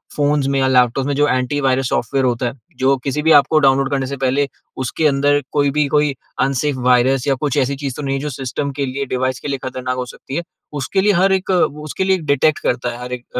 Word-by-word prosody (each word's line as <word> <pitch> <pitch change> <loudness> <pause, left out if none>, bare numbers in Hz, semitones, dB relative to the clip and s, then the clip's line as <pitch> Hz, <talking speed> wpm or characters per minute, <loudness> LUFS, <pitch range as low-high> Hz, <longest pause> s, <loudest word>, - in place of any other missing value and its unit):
phones 145 -1 +1
में 140 0 +1
या 130 - +2
laptop 125 0 +2
में 145 - -1
जो 145 +1 +3
एंटी-वायरस 130 -1 0
सॉफ़्टवेयर 135 +2 0
होता 125 0 0
है, - - -4 0.2
जो 135 +1 +3
किसी 140 +2 -1
भी 160 +2 +3
एप 145 - +6
को 155 - +4
डाउनलोड 135 -1 +3
करने 135 -1 0
से 140 +1 -5
पहले 135 +2 +1 0.4
उसके 150 +5 0
अंदर 145 0 +2
कोई 145 -1 +2
भी, 150 +1 +1
कोई 150 +1 +2
मेबी 140 -2 -2 0.3
अनसेफ 135 +1 -1
वायरस 125 +1 +3
या 140 - +3
कुछ 145 -2 -1
ऐसी 140 0 +1
चीज़ 135 -2 -5
तो - - -6
नहीं 135 -1 -1
है, 135 - -3
जो 150 - -3
सिस्टम 135 +1 -4
के 140 - 0
लिए, 135 +2 -3
डिवाइस 130 0 -2
के - - -7
लिए 140 - -1
ख़तरनाक 130 -1 -3
हो 125 - -2
सकती 135 +2 -9
है, 170 - -1 0.4
उसके 190 +9 0
लिए 205 +1 +3
हर 190 +2 +3
एक, 190 0 -1
उसके 155 -2 0
लिए 190 0 +2
डिटेक्ट 150 +2 +2
करता 120 0 -1
है, 120 0 -7
हर 125 0 -6
एक 125 -1 -6
135 Hz, 250 wpm, -18 LUFS, 130-145 Hz, 0.4 s, एप